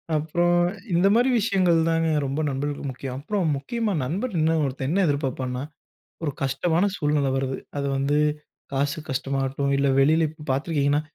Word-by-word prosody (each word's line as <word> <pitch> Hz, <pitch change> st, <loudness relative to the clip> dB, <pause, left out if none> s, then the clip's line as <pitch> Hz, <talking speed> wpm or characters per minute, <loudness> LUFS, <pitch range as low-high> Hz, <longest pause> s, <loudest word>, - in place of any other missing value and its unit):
அப்புறம், 175 Hz, +3 st, +2 dB, 0.4 s
இந்தமாரி 205 Hz, +9 st, +4 dB
விஷயங்கள் 185 Hz, -5 st, +3 dB
தாங்க 165 Hz, 0 st, +1 dB, 0.2 s
ரொம்ப 140 Hz, +3 st, -2 dB
நண்பர்களுக்கு 140 Hz, +1 st, -3 dB
முக்கியம். 130 Hz, 0 st, -6 dB
அப்புறம் 190 Hz, +4 st, -1 dB
முக்கியமா 220 Hz, -, -2 dB
நண்பர் 195 Hz, -, -2 dB
என்ன 160 Hz, +1 st, +3 dB
ஒருத்தன் 135 Hz, -1 st, -2 dB
என்ன 190 Hz, +5 st, +1 dB
எதிர்பார்ப்பான்னா, 130 Hz, -3 st, -2 dB, 0.6 s
ஒரு 145 Hz, -3 st, -1 dB
கஷ்டமான 160 Hz, +7 st, +1 dB
சூழ்நிலை 145 Hz, -2 st, +1 dB
வருது, 135 Hz, 0 st, -1 dB, 0.2 s
அது 140 Hz, -, -1 dB
வந்து, 140 Hz, +2 st, +1 dB, 0.5 s
காசு 140 Hz, +4 st, 0 dB
கஷ்டமாகட்டும், 135 Hz, +1 st, -1 dB
இல்ல 140 Hz, 0 st, +2 dB
வெளில 155 Hz, +4 st, +4 dB
இப்ப 155 Hz, -1 st, -13 dB
பார்த்துருக்கீங்கன்னா, 145 Hz, +1 st, +1 dB
145 Hz, 140 wpm, -24 LUFS, 135-170 Hz, 0.6 s, இந்தமாரி